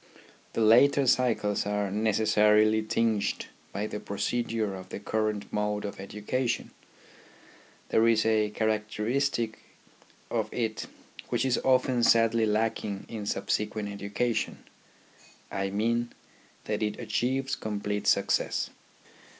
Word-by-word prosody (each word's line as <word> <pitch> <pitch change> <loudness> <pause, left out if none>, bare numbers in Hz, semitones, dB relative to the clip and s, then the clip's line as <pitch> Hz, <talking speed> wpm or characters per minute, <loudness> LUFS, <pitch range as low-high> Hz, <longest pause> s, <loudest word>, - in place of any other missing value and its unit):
The - - -1
later 135 +6 +5
cycles 120 -5 +2
are 105 -1 -1
neces 110 +1 +1
sarily 110 +1 +4
tinged 110 -3 0 0.3
by 100 - -3
the 105 -1 -4
procedure 110 0 -2
of 95 -1 -9
the - - -6
current 110 0 -1
mode 105 0 -1
of 100 - -6
education. 105 +6 -2 1.2
There 115 +1 +4
is 110 -1 +3
a 110 -1 +2
characteristic 110 +3 -1 0.7
of - - -1
it 110 -3 -2 0.4
which - - 0
is 130 -2 +2
often 130 -1 +3
sadly 115 -1 +4
lacking 105 -2 -1
in 105 -3 -5
subsequent 105 0 -1
education; 100 +4 -2 0.9
I 95 0 -1
mean, 115 +4 0 0.5
that 105 0 -2
it 105 -1 -2
achieves 135 +2 -1
complete 105 -1 -3
success. - - +1
110 Hz, 115 wpm, -28 LUFS, 105-115 Hz, 1.2 s, later